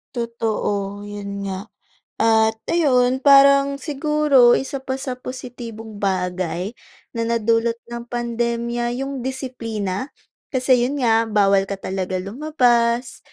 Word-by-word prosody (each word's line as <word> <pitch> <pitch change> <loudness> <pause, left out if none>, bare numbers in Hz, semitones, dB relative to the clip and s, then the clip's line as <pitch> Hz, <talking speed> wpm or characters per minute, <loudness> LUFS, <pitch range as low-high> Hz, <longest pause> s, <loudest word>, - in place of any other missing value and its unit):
Totoo, 210 -4 -2
yun 200 -1 -6
nga, 195 +3 -6 0.4
at 220 0 +3 0.2
ayun 260 -6 +3
parang 280 0 +6
siguro 285 -3 +3
isa 270 +1 -3
pa 265 0 -4
sa 260 -2 -5
positibong 235 -4 -8
bagay 185 0 -2 0.4
na 230 -1 -2
nadulot 230 0 +1 0.2
ng 235 0 -6
pandemya 235 0 -2
yung 275 -1 -4
disiplina. 240 -5 -4 0.4
Kasi 255 -1 +2
yun 285 - -3
nga 225 -1 +3
bawal 200 -2 +3
ka 200 - -3
talaga 190 -1 -4
lumabas, 240 -1 +1
235 Hz, 115 wpm, -21 LUFS, 205-260 Hz, 0.4 s, parang